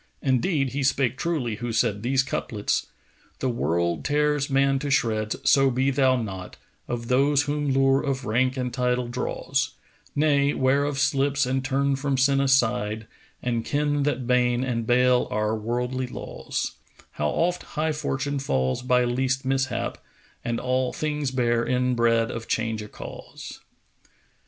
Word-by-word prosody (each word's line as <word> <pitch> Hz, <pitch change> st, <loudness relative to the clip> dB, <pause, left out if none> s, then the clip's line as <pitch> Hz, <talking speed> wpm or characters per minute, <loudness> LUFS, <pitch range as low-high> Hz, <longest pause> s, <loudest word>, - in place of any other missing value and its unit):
Indeed 135 Hz, +2 st, +1 dB
he 140 Hz, +3 st, -3 dB
spake 130 Hz, -2 st, +1 dB
truly 130 Hz, -9 st, -2 dB
who 120 Hz, 0 st, -4 dB
said 110 Hz, -3 st, +1 dB
these 130 Hz, +3 st, +2 dB
couplets, 110 Hz, -5 st, -2 dB, 0.5 s
The 130 Hz, -, -1 dB
world 85 Hz, -, 0 dB
tears 150 Hz, -1 st, +1 dB
man 135 Hz, 0 st, +2 dB
to 145 Hz, +1 st, -3 dB
shreds, 110 Hz, -5 st, +1 dB
so 135 Hz, -1 st, +5 dB
be 130 Hz, +2 st, +1 dB
thou 130 Hz, -1 st, +3 dB
not 95 Hz, -6 st, -5 dB
* -, -, -41 dB
Of 120 Hz, -1 st, -4 dB
those 140 Hz, +3 st, +3 dB
whom 145 Hz, -1 st, -1 dB
lure 135 Hz, 0 st, +3 dB
of 135 Hz, -2 st, -2 dB
rank 130 Hz, +4 st, +1 dB
and 125 Hz, -1 st, -2 dB
title 125 Hz, -1 st, 0 dB
draws: 130 Hz, +2 st, -2 dB, 0.4 s
Nay; 145 Hz, -1 st, +3 dB
'ware 135 Hz, +2 st, +2 dB
of 145 Hz, -1 st, -2 dB
slips 140 Hz, 0 st, +2 dB
and 130 Hz, +1 st, -1 dB
turn 140 Hz, +1 st, +1 dB
from 135 Hz, 0 st, -1 dB
sin 135 Hz, +1 st, +3 dB
aside 120 Hz, -5 st, +1 dB, 0.2 s
* -, -, -32 dB
And 120 Hz, -2 st, -1 dB
ken 145 Hz, +1 st, 0 dB
that 135 Hz, -3 st, -1 dB
bane 125 Hz, 0 st, +2 dB
and 115 Hz, -3 st, -2 dB
bale 125 Hz, 0 st, +3 dB
are 105 Hz, +1 st, 0 dB
worldly 125 Hz, +3 st, -2 dB
laws: -, -, -4 dB, 0.4 s
How 75 Hz, -, -1 dB
oft 175 Hz, -, 0 dB, 0.2 s
high 160 Hz, +1 st, +1 dB
Fortune 145 Hz, -2 st, -2 dB
falls 65 Hz, -, 0 dB
by 125 Hz, 0 st, +3 dB
least 130 Hz, +2 st, 0 dB
mishap 135 Hz, 0 st, -1 dB, 0.2 s
* -, -, -33 dB
And 120 Hz, -1 st, -2 dB
all 130 Hz, 0 st, 0 dB
things 150 Hz, -2 st, -2 dB
bear 120 Hz, -2 st, +1 dB
inbred 120 Hz, -2 st, +2 dB
of 115 Hz, 0 st, -6 dB
change 110 Hz, -1 st, -1 dB
a 105 Hz, -, -7 dB
cause!' -, -, -9 dB
130 Hz, 160 wpm, -25 LUFS, 120-140 Hz, 0.5 s, so